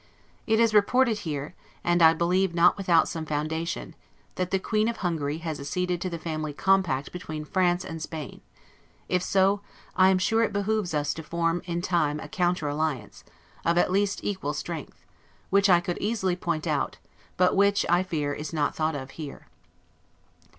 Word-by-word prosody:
It 220 -1 +3
is 230 -2 +4
reported 220 +2 +3
here, 145 -1 -4 0.3
and 175 0 +2
I 160 0 +7
believe 175 +2 +1
not 175 +1 +5
without 180 -4 +3
some 165 - -4
foundation, 160 +2 -3 0.4
that 185 -1 -2
the 190 - +2
queen 215 +3 0
of 235 - -2
Hungary 160 -5 -2
has 155 -3 -3
acceded 180 +5 -2
to 185 - -2
the 170 - -4
Family 155 -2 -4
Compact 180 -6 +1
between 155 -4 -6
France 180 +1 +1
and 160 0 -6
Spain: 155 -2 -7 0.7
if 180 -1 +1
so, 195 +2 +2 0.3
I 185 0 +6
am 190 - +4
sure 225 +5 +2
it 230 - +1
behooves 205 -4 0
us 145 -1 0
to 160 - -7
form 165 +2 -1
in 175 -1 -3
time 155 -5 +1
a - - -7
counter 175 -4 0
alliance, 145 -6 -3 0.4
of 170 +1 +2
at 175 - +3
least 200 +1 +1
equal 170 -8 -2
strength; 160 0 -6 0.5
which 200 +1 +4
I 175 -2 +7
could 175 0 -4
easily 200 -4 0
point 170 -3 -2
out, 150 -3 -1 0.4
but 180 0 +3
which, 200 0 +3
I 175 +1 +4
fear, 155 -6 -2
is 150 +2 -5
not 150 -3 0
thought 155 -1 0
of 135 -1 -6
here. 145 -3 -9
175 Hz, 180 wpm, -26 LUFS, 155-190 Hz, 0.7 s, I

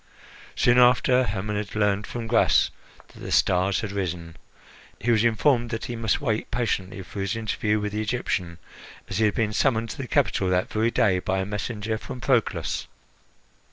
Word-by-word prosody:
Soon 120 +1 +4
after 125 +1 +4
Hermon 105 +1 -3
had 105 0 -5
learned 105 -1 +1
from 120 -2 -5
Gras 115 0 +3 0.4
that - - -16
the - - -7
stars 95 +1 +2
had 105 -3 -4
risen, 85 -4 -4 0.6
he 120 - 0
was 110 -2 +3
informed 120 +1 +2
that 115 -1 -4
he 120 - -5
must 115 +2 0
wait 115 -7 -2
patiently 100 -4 -2
for 100 +2 -7
his 95 +1 -1
interview 110 -1 -1
with 105 0 -3
the 105 +1 -2
Egyptian, 105 -7 -2 0.5
as 95 - -3
he 110 - +4
had 105 - +1
been 110 -2 0
summoned 115 -2 +1
to - - -8
the 130 - -4
capital 95 -4 +1
that 90 0 0
very 110 +2 +2
day 110 -6 +2
by 95 +1 -1
a 95 - -1
messenger 105 +1 -3
from 125 - -8
Proclus. 125 -3 0
110 Hz, 185 wpm, -25 LUFS, 100-115 Hz, 0.6 s, Soon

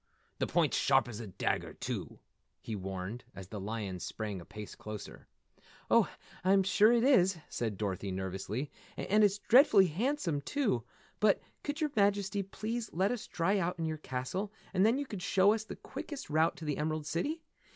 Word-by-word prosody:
The - - +1
point's - - +2
sharp - - +4
as 115 -3 -6
a 115 - -6
dagger, 95 - -2
too," - - -4 0.4
he 110 - -5
warned, 95 +4 -5
as 95 -1 -9
the 105 - -5
lion 100 -2 -4
sprang 105 -1 -4
a - - -12
pace 105 -1 -8
closer. 105 -1 -8 0.6
"Oh, - - +5 0.3
I'm 190 +1 +5
sure 200 +4 +5
it 235 -1 +4
is," 190 -9 +5
said 110 -4 -2
Dorothy 100 -1 -2
nervously. 95 +8 -3 0.3
"And 210 +2 +3
it's 205 -1 +4
dreadfully 220 -3 +6
handsome, 180 - 0
too. 225 - 0 0.4
But 210 -2 +4 0.2
could 295 +2 -4
your 305 -2 +1
Majesty 200 -1 +2
please 220 +4 -4
let 190 +4 +1
us 245 -3 -4
dry 195 +4 +1
out 180 0 -1
in 165 - -2
your 155 -1 -2
castle 150 +10 -3 0.2
and 185 0 +3
then 225 +4 +4
could 205 -8 -6
you - - -3
show 195 +2 +5
us 220 -1 -3
the - - -7
quickest 295 - -7
route 160 +2 +3
to 165 - -7
the 150 -1 -1
Emerald 155 0 -1
City? 295 - -2
175 Hz, 180 wpm, -32 LUFS, -, 0.6 s, dreadfully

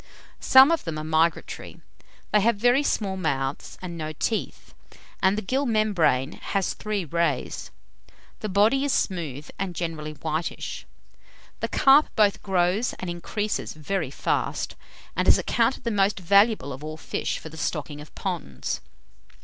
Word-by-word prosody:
Some 265 +4 +7
of 335 - +1
them 165 -2 -4
are 155 - -4
migratory. 160 +1 -1 0.5
They 210 - +4
have 230 +2 +3
very 245 +6 +3
small 200 -9 -1
mouths 135 -6 -2
and 175 -2 -5
no 155 0 -4
teeth, 220 +8 -3 0.5
and 190 +2 +3
the 215 - -2
gill 265 +7 0
membrane 185 - +2
has 195 -2 -1
three 210 -4 -3
rays. 170 +2 -1 0.7
The 215 - -4
body 215 +8 +3
is 285 - +1
smooth, 155 - -2
and 190 -3 -3
generally 160 -3 -4
whitish. 160 +2 -4 0.7
The - - -1
carp 275 +3 +5
both 205 -2 +3
grows 190 +4 +1
and 180 -2 -5
increases 205 +5 -3
very 155 0 -2
fast, 140 - -2 0.4
and - - 0
is - - +7
accounted 235 +2 +1
the 235 - -1
most 200 -1 +2
valuable 200 - +3
of 135 +3 -9
all 155 0 -6
fish - - -3
for 160 - -9
the 160 - -12
stocking 150 -2 -3
of 150 - -14
ponds. 65 -1 -4
185 Hz, 150 wpm, -25 LUFS, 155-215 Hz, 0.7 s, Some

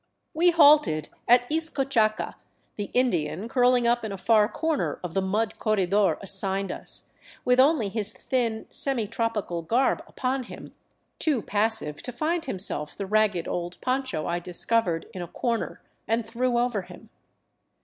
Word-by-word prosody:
We 345 +3 +4
halted 295 - +5 0.2
at 245 +1 +5
Izcochaca, 275 -9 +1 0.4
the 205 - -3
Indian 195 -6 0
curling 245 0 +3
up 240 0 +2
in 220 - -4
a 195 - -5
far 210 +2 +3
corner 320 +1 -1
of 175 -2 -5
the 195 - +1
mud 205 +3 -1
corredor 200 -1 +2
assigned 195 0 0
us, - - -6 0.3
with 250 0 +3
only 270 -5 +4
his 205 0 -1
thin 230 -4 -2
semi 265 -6 0
tropical 210 -6 -2
garb 240 +10 +1
upon 260 0 -2
him, - - -11 0.5
too 285 -9 +1
passive 210 -8 -1
to 250 - -5
find 315 +7 -1
himself 185 - 0
the 200 - -3
ragged 210 -4 +1
old 175 0 -4
poncho 255 - -1
I 175 0 -1
discovered 180 0 -1
in 185 - -6
a 175 - -5
corner 230 +6 -3 0.2
and 225 0 0
threw 240 +2 -1
over 240 -4 0
him. 180 - -14
225 Hz, 150 wpm, -26 LUFS, 195-255 Hz, 0.5 s, halted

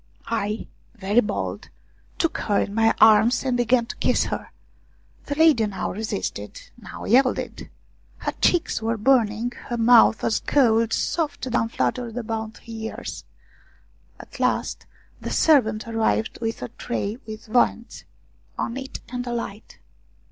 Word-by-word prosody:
I, 215 -1 -2 0.3
very 205 +1 +2
bold, 210 -3 -3 0.5
took 330 - 0
her 205 -2 +1
in 200 - -2
my 225 +1 +3
arms 220 +3 +6
and 260 -2 0
began 240 0 +2
to 235 - -7
kiss - - +2
her. - - -4 0.8
The 285 - -2
lady 300 -8 +4
now 200 - -3
resisted, 220 - -4 0.2
now - - -10
yielded; 255 +1 +1 0.5
her - - -3
cheeks 345 -9 +2
were 225 +1 -1
burning, 230 -1 +2 0.2
her 240 - -3
mouth 230 -1 +5
was 225 - +1
cold, 230 -5 +2
soft 305 +1 -1
down 225 -1 +1
fluttered 235 0 -2
about 220 -2 -4
her - - -20
ears. 225 -1 -6 0.9
At - - -12
last - - -1 0.3
the - - -5
servant 225 -9 +3
arrived 225 -1 0
with 225 0 -3
a - - -5
tray 230 -1 -4
with 220 +2 -8
viands 235 0 0 0.5
on 235 - -3
it, 270 0 -7
and 245 0 -3
a 240 - -2
light. 225 -2 -6
230 Hz, 140 wpm, -23 LUFS, 220-245 Hz, 0.9 s, arms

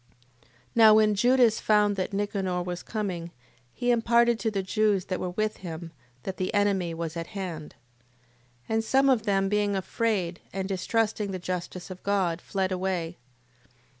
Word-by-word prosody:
8:12. - - -29 0.3
Now 220 -2 +7
when 215 -1 +4
Judas 240 +1 +4
found 210 -1 +3
that 190 +2 -2
Nicanor 195 -3 -1
was 180 0 -4
coming, 185 -6 -4 0.4
he 245 - 0
imparted 235 0 +3
to 225 - 0
the 200 -3 -2
Jews 205 -1 +1
that 185 - -3
were 180 - -2
with 215 +4 -2
him, 165 -2 -7 0.3
that 190 - -5
the 185 - -1
enemy 200 -4 +1
was 165 -1 -4
at 165 0 -4
hand. 165 -6 -6 0.9
8:13. - - -36
And 220 0 +1
some 270 +4 +3
of 235 -5 +2
them 195 -1 +2
being 205 0 +1
afraid, 190 -3 -1
and 190 0 -3
distrusting 210 +2 -1
the 190 - -3
justice 180 0 -5
of 185 - -9
God, 185 -4 0
fled 190 -1 -2
away. 180 -2 -2
195 Hz, 165 wpm, -27 LUFS, 180-215 Hz, 0.9 s, Now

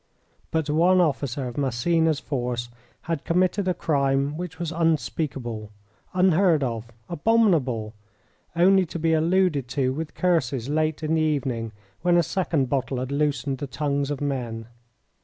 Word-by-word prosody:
But 160 -2 -1
one 170 +5 +4
officer 140 -5 0
of 120 +3 -5
Massena's 155 +4 +1
force 120 -3 -3 0.3
had 165 -4 -3
committed 185 +3 +1
a 180 - +1
crime 140 -1 +1
which 175 -1 -6
was 170 -2 -3
unspeakable, 145 -9 -1 0.5
unheard 180 -4 +4
of, 115 -2 -3 0.2
abominable; 160 - +1 0.6
only 185 +1 +4
to 170 - -5
be 165 0 +1
alluded 160 -4 +2
to 130 +1 0
with 155 +2 -5
curses 140 -8 0
late 155 +1 0
in 155 +1 0
the 160 - +2
evening, 135 -7 -1 0.3
when 175 -1 +3
a 170 - +4
second 155 -4 0
bottle 135 0 -1
had 130 +2 -3
loosened 140 -2 -1
the 145 - -4
tongues 140 0 -1
of 145 -1 -3
men. 120 -5 -3
150 Hz, 145 wpm, -25 LUFS, 130-170 Hz, 0.6 s, one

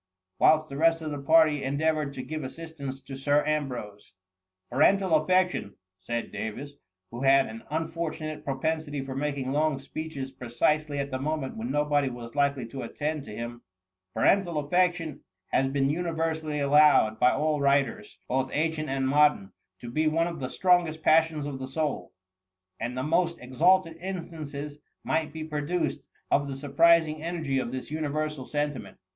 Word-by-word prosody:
*' 95 0 -54
whilst 155 0 +5
the 140 - -7
rest 165 +1 +3
of 155 - -4
the 145 -1 -4
party 155 -1 +4
en 135 +1 -1
deavoured 155 -2 +1
to 130 -2 -6
give 155 -1 -5
assistance 140 -1 -7
to 135 - -9
Sir 145 +2 +2
Ambrose. 125 -11 -3 0.5
^^ - - -50
Parental 190 +5 +4
affection,^ 180 - +2 0.2
said 120 +4 -4
Davis, 125 +7 -5 0.4
who 120 +2 -6
had 135 0 +5
an 110 +1 -8
unfortunate 160 0 -3
propensity 145 +1 -2
for 135 -1 -6
making 140 -2 -2
long 150 0 +1
speeches 135 -1 -6
precisely 145 +5 0
at 140 0 -3
the 130 - -2
moment 150 -1 -2
when 115 +2 -4
nobody 145 -1 +1
was 120 -1 -8
likely 140 -3 +1
to 130 +3 -7
attend 150 -1 -3
to 105 - -8
him; 120 +1 -6 0.5
parental 175 - +3
affection 165 0 +1 0.3
has 135 - +2
been 135 0 +1
universally 160 -2 -2
allowed 145 -6 +5
by 125 - +6
all 150 +1 0
writers, 140 -6 +1
both 130 +1 0
ancient 155 0 -1
and 135 0 0
modem, 145 -8 +3 0.2
to 120 - -10
be 155 +5 +1
one 165 +2 +2
of 170 -2 -4
the 130 -2 -3
strongest 175 -3 +2
passions 160 -2 +3
of 140 -2 -5
the 130 - -5
soul, 150 +2 -2 0.7
and 125 +2 -4
the 130 - -1
most 170 +3 +1
ex 125 +1 -11
alted 180 -2 +4
instances 155 -5 -6 0.2
might 155 -1 0
be 160 +1 -6
produced 150 0 -2 0.3
of 140 0 +3
the 135 - -4
sur 145 +1 -7
prising 160 +1 +4
energy 160 -5 -1
of 120 - -3
this 130 +2 -6
universal 150 -2 -2
sentiment.'' 145 -2 -3
150 Hz, 170 wpm, -27 LUFS, 135-160 Hz, 0.7 s, by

